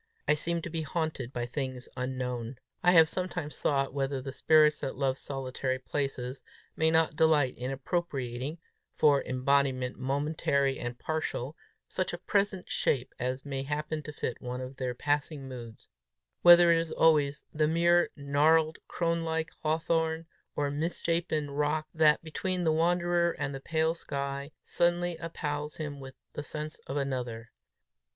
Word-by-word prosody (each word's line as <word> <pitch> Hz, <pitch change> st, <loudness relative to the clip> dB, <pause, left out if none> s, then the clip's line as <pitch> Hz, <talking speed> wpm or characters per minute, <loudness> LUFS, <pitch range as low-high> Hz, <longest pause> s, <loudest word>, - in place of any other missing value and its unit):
I -, -, +5 dB
seemed 170 Hz, +2 st, -1 dB
to 170 Hz, -, -5 dB
be 165 Hz, -1 st, -2 dB
haunted 155 Hz, -5 st, -3 dB
by 120 Hz, -3 st, -2 dB
things 130 Hz, 0 st, -4 dB
unknown. 125 Hz, -1 st, -3 dB, 0.2 s
I 180 Hz, 0 st, +5 dB
have 165 Hz, -2 st, +8 dB
sometimes 175 Hz, -4 st, -3 dB
thought 135 Hz, -2 st, +1 dB
whether 135 Hz, -1 st, -1 dB
the 135 Hz, +1 st, -6 dB
spirits 155 Hz, +2 st, +4 dB
that 135 Hz, -, -4 dB
love 135 Hz, -1 st, +1 dB
solitary 130 Hz, -1 st, -3 dB
places, 130 Hz, -1 st, -3 dB, 0.3 s
may 160 Hz, 0 st, +3 dB
not 160 Hz, -1 st, +3 dB
delight 150 Hz, -5 st, +3 dB
in 125 Hz, +1 st, -4 dB
appropriating, 135 Hz, -1 st, -3 dB, 0.4 s
for 145 Hz, -3 st, +4 dB
embodiment 130 Hz, -1 st, +1 dB
momentary 140 Hz, 0 st, 0 dB
and 120 Hz, 0 st, -4 dB
partial, 155 Hz, -2 st, -3 dB, 0.3 s
such 185 Hz, -, -2 dB
a -, -, -2 dB
present 195 Hz, 0 st, 0 dB
shape 130 Hz, -2 st, 0 dB
as 130 Hz, +2 st, -2 dB
may 135 Hz, -1 st, -3 dB
happen 150 Hz, +2 st, -3 dB
to 150 Hz, -, -7 dB
fit 125 Hz, -4 st, -4 dB
one 125 Hz, 0 st, -4 dB
of 130 Hz, +1 st, -7 dB
their 125 Hz, -2 st, -2 dB
passing 145 Hz, +1 st, -1 dB
moods; 120 Hz, -4 st, -9 dB, 0.5 s
whether 175 Hz, 0 st, +9 dB
it 165 Hz, -, +5 dB
is 165 Hz, -1 st, -3 dB
always 150 Hz, -3 st, +3 dB
the 155 Hz, 0 st, +2 dB
mere 170 Hz, +2 st, +4 dB
gnarled, 155 Hz, +3 st, +3 dB
crone 170 Hz, -1 st, 0 dB
like 160 Hz, -1 st, -2 dB
hawthorn, 160 Hz, +1 st, 0 dB, 0.3 s
or 145 Hz, -1 st, 0 dB
misshapen 160 Hz, 0 st, -1 dB
rock, 150 Hz, +2 st, 0 dB
that, 155 Hz, -1 st, +4 dB
between 180 Hz, +3 st, -2 dB
the 160 Hz, -, +3 dB
wanderer 170 Hz, +1 st, +2 dB
and 145 Hz, -1 st, -3 dB
the 135 Hz, -, -5 dB
pale 160 Hz, +2 st, +1 dB
sky, 140 Hz, -3 st, -4 dB
suddenly 175 Hz, 0 st, +1 dB
appals 150 Hz, -3 st, -4 dB
him 145 Hz, -3 st, -5 dB
with 135 Hz, -1 st, -10 dB, 0.2 s
the -, -, -4 dB
sense 150 Hz, +1 st, -5 dB
of 135 Hz, -, -3 dB
another. 125 Hz, -4 st, -3 dB
145 Hz, 155 wpm, -30 LUFS, 135-160 Hz, 0.5 s, whether